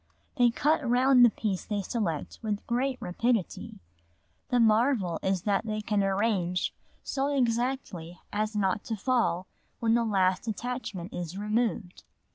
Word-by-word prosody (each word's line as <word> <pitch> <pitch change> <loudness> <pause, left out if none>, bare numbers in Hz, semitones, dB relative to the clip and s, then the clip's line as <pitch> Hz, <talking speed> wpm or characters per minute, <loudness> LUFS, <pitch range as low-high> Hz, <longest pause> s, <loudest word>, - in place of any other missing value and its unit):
They 245 -2 +5
cut 295 +6 +1
round 250 +1 +5
the 240 - +8
piece 205 -4 -2
they 205 -2 -2
select 185 - -3
with 210 -2 -3
great 255 +2 0
rapidity 220 +3 -1 0.7
the 245 - +2
marvel 220 - +3
is 190 -2 0
that 205 +1 0
they 215 0 -2
can 210 -1 0
arrange 195 -3 0 0.3
so 275 0 -1
exactly 240 - -1
as 215 +1 -1
not 200 0 0
to 225 - -2
fall 200 -6 +1 0.3
when 225 -1 +2
the 235 0 +3
last 190 -2 +1
attachment 220 -5 -4
is 175 +1 -5
removed. 210 -3 -1
215 Hz, 140 wpm, -28 LUFS, 190-245 Hz, 0.7 s, the